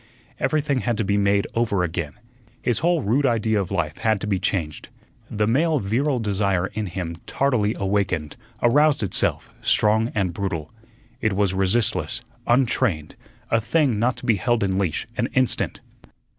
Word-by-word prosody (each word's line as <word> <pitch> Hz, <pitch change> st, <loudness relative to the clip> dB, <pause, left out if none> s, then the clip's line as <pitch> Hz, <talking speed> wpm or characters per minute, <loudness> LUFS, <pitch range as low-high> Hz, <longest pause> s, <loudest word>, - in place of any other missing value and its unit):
Everything 150 Hz, -3 st, +1 dB
had 120 Hz, -2 st, -1 dB
to 110 Hz, -, 0 dB
be 100 Hz, 0 st, 0 dB
made 100 Hz, 0 st, +2 dB
over 110 Hz, -6 st, +1 dB
again. 85 Hz, -3 st, -3 dB, 0.5 s
His 120 Hz, -3 st, +1 dB
whole 170 Hz, -3 st, +1 dB
rude 120 Hz, +8 st, +2 dB
idea 110 Hz, -3 st, +1 dB
of 95 Hz, -, -4 dB
life 85 Hz, -5 st, -2 dB
had 110 Hz, -2 st, +1 dB
to -, -, -2 dB
be 100 Hz, -3 st, 0 dB
changed. 85 Hz, -6 st, -2 dB, 0.4 s
The 105 Hz, 0 st, 0 dB
male 150 Hz, +8 st, +2 dB
virile 130 Hz, +6 st, 0 dB
desire 100 Hz, -4 st, 0 dB
in 105 Hz, -1 st, -3 dB
him 85 Hz, -2 st, -5 dB
tardily 120 Hz, -6 st, +1 dB
awakened, 95 Hz, -6 st, -1 dB, 0.3 s
aroused 145 Hz, +2 st, +4 dB
itself, 95 Hz, -, 0 dB
strong 110 Hz, +2 st, +2 dB
and 95 Hz, -4 st, 0 dB
brutal. 85 Hz, -5 st, -3 dB, 0.5 s
It 110 Hz, -, +1 dB
was 100 Hz, -1 st, +1 dB
resistless, 110 Hz, +5 st, 0 dB, 0.3 s
untrained, 120 Hz, -, +1 dB, 0.4 s
a 115 Hz, -, +3 dB
thing 130 Hz, -2 st, +1 dB
not 125 Hz, +3 st, +1 dB
to -, -, -9 dB
be 115 Hz, -4 st, +3 dB
held 120 Hz, -1 st, +1 dB
in 95 Hz, -1 st, 0 dB
leash 90 Hz, -6 st, -1 dB
an -, -, +1 dB
instant. 130 Hz, -2 st, +1 dB
105 Hz, 160 wpm, -23 LUFS, 95-120 Hz, 0.5 s, aroused